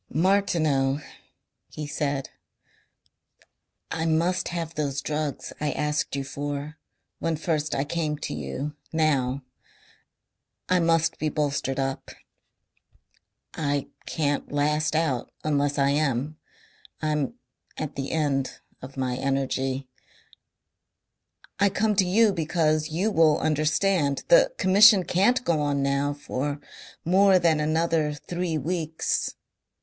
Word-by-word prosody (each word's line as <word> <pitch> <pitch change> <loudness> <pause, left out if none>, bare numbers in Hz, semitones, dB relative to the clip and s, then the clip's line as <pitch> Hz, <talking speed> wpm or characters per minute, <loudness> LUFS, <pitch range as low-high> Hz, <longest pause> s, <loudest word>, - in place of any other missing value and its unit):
"Martineau," 155 -6 +2 0.7
he 150 - -6
said, 145 -2 -2 1.6
"I 160 0 -1
must 170 +3 +1
have 170 -2 -4
those 145 -3 -2
drugs 150 0 -3
I 150 -2 0
asked 150 -1 -1
you 140 - -2
for 145 +3 -5 0.4
when 165 -1 0
first 155 -1 -1
I 135 - +1
came 150 0 -2
to - - -5
you 75 - -4 0.2
now. 140 -4 +1 1.2
I 185 0 +3
must 165 -1 +2
be 155 - 0
bolstered 140 -3 -1
up. 135 0 -3 1.4
I 145 -3 -1 0.2
can't 145 -3 -1
last 150 +2 +1
out 155 -7 0
unless 145 -1 +1
I 140 0 +3
am. 145 0 0 0.6
I'm 150 -3 0 0.4
at 155 - -4
the 135 -1 -3
end 140 -4 -1 0.2
of 130 +1 -10
my 130 -1 -1
energy. 135 0 -1 1.7
I 200 0 +4
come 210 +2 +1
to 190 -3 +4
you 210 +3 +4
because 155 -2 +1
you 185 +8 0
will 160 -5 +4
understand. 155 0 +1
The - - +6
Commission 200 +1 +7
can't 210 +9 +2
go 160 -3 +2
on 145 -1 0
now 140 +1 +1
for 145 0 -3 0.5
more 190 +2 +5
than 165 -3 +3
another 155 0 +1
three 175 +1 -3
weeks. 160 +1 -2
150 Hz, 115 wpm, -26 LUFS, 140-165 Hz, 1.7 s, Commission